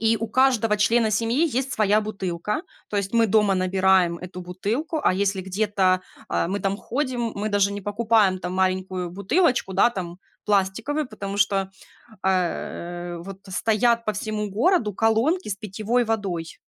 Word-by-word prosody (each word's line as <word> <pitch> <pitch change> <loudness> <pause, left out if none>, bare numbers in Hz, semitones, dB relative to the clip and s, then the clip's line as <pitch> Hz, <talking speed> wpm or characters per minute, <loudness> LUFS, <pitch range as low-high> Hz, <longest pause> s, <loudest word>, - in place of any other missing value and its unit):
И 225 0 +3
у 225 - -3
каждого 230 -2 +3
члена 220 +1 +3
семьи 235 +9 +1
есть 265 -1 -2
своя 215 0 +3
бутылка. 210 - -3 0.3
То 205 - -2
есть 200 -1 -2
мы 230 -1 +4
дома 210 -1 +3
набираем 185 -2 +2
эту 180 +1 -8
бутылку, 215 - -3
а 185 - +3
если 195 0 0
где-то, 190 -1 +1 0.3
э, - - 0
мы 195 +2 -1
там 195 0 -1
ходим, 245 -1 -2
мы 210 +2 -2
даже 200 -1 +2
не 205 - -5
покупаем 205 -1 +2
там 180 - -4
маленькую 185 -1 -1
бутылочку, 200 - +1
да, 200 - +5
там 180 -5 -6 0.3
пластиковую, 215 +9 0
потому 200 -3 -6
что, 195 -1 +1 0.5
э, 190 - +3
э, 175 -1 -2
вот 190 +3 -9
стоят 230 +5 +1
по 215 - 0
всему 210 +1 -3
городу 230 - +2
колонки 225 - +1
с 195 - -1
питьевой 215 +4 -1
водой. 195 -7 -3
205 Hz, 160 wpm, -24 LUFS, 190-225 Hz, 0.5 s, да